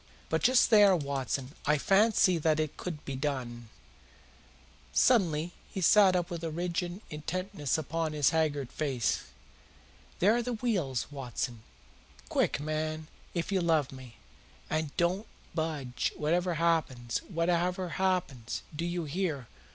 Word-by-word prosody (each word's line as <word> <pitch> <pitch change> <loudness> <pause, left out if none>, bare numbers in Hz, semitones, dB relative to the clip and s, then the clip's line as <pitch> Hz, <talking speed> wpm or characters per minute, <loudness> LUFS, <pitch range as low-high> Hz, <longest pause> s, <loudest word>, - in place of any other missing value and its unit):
But - - +1
just 255 0 +4
there, 205 -3 +7
Watson, 140 -3 -2
I 150 0 +4
fancy 195 0 +4
that 155 0 +2
it 155 -2 -1
could 165 -5 -6
be 135 - -4
done." 125 -4 -3 1.2
Suddenly 175 -9 +3 0.2
he - - -4
sat 190 +1 +6
up 175 0 -1
with 170 -1 -5
a 165 - -1
rigid 175 +3 -3
intentness 160 0 -2
upon 160 +1 -2
his 145 -3 +3
haggard 150 -5 0
face. 135 -7 -1 0.9
"There 205 +5 +4
are 240 - +1
the 245 +1 -3
wheels, 185 - -1
Watson. 125 -4 -4 0.7
Quick, - - +1
man, 155 +1 -3 0.3
if 170 +3 -2
you 190 -2 +2
love 160 -5 +2
me! 130 -3 -11 0.5
And 155 -1 0
don't 180 +5 +1 0.3
budge, 150 -6 -2
whatever 175 +3 0
happens 150 -8 0
whatever 180 +1 0
happens, 175 -12 -1
do 165 +3 -2
you 175 0 -2
hear? 155 -4 -2
160 Hz, 135 wpm, -30 LUFS, 145-180 Hz, 1.2 s, there